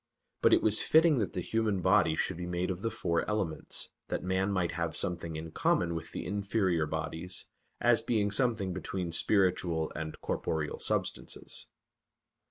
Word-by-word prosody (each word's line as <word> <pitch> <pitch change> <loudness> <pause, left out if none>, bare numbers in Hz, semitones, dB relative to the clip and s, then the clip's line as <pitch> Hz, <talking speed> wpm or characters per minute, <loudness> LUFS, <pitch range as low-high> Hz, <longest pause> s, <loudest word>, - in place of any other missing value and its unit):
But - - +5
it - - +5
was 110 0 +4
fitting 160 -3 +5
that 100 -6 -1
the 90 - -2
human 110 0 0
body 95 -3 +4
should 80 - -1
be 90 0 -5
made 90 +1 -1
of 90 0 -5
the 115 - 0
four 95 -7 0
elements, 100 -7 -1 0.2
that - - -3
man 95 +2 0
might 90 -3 0
have 85 -1 -2
something 85 -2 -2
in 80 +1 -6
common 85 +2 +1
with 80 0 -6
the - - -5
inferior 100 -4 0
bodies, 85 +4 -3 0.3
as - - +4
being 105 -3 +1
something 110 -4 +1
between 90 -1 -3
spiritual 90 -3 +1
and 80 0 -5
corporeal 80 -2 -2
substances. - - -2
90 Hz, 165 wpm, -31 LUFS, 85-105 Hz, 0.3 s, But